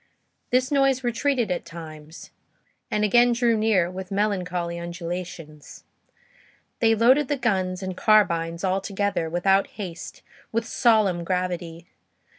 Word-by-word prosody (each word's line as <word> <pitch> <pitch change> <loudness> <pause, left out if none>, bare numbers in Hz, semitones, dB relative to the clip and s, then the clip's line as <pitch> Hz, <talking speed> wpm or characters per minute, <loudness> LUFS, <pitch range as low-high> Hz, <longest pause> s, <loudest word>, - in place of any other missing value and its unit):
This 255 +2 +1
noise 275 -2 +2
retreated 240 -2 0
at 180 - -2
times, 160 -1 -11 0.6
and 210 - 0
again 240 +3 +4
drew 235 -1 +2
near, 215 -5 +2
with 185 0 -7
melancholy 180 -4 -2
undulations. 170 -3 -7 1.0
They 225 -1 +4
loaded 255 +6 +4
the 290 - -1
guns 190 -6 -1
and 185 -1 -4
carbines, 170 -6 +2
all 190 0 0
together, 200 -4 -2
without 195 +4 +2
haste, 180 -5 -7 0.3
with 230 0 -1
solemn 215 -8 +2
gravity. 175 -2 -3
190 Hz, 120 wpm, -24 LUFS, 170-225 Hz, 1.0 s, again